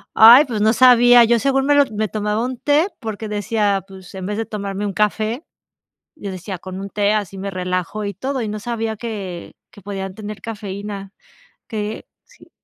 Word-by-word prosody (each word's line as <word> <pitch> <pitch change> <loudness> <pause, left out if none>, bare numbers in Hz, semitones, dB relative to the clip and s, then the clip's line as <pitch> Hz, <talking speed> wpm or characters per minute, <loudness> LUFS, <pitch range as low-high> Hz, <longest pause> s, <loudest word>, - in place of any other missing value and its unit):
Ay, 235 +6 +9
pues 235 -6 -3
no 220 +1 +4
sabía, 245 -1 +7
yo, 235 0 +3
según 270 +1 +1
me 290 - +4
lo 285 0 +5
me 215 0 -1
tomaba 210 +1 -1
un 255 0 -3
té 295 +7 +2
porque 220 -1 -5
decía: 205 -1 0
"Pues 190 -1 -13
en 190 -1 -6
vez 210 +2 -3
de 225 - -2
tomarme 200 -1 -4
un 205 - -2
café", 215 - -1 0.7
yo 200 -10 -6
decía: 185 +1 -6
"Con 185 +1 -7
un 200 - -6
té 205 +1 +1
así 200 -2 -2
me 200 +1 -4
relajo 185 +2 -3
y 200 0 -3
todo", 260 +7 -3
y 220 - -3
no 210 0 -4
sabía 225 -1 -3
que 200 -6 -6 0.2
que 205 - -15
podían 195 -1 -5
tener 210 -1 -8
cafeína, 200 -2 -6 0.5
que, 215 -1 -5 0.2
sí. - - -21
210 Hz, 195 wpm, -20 LUFS, 195-230 Hz, 0.7 s, Ay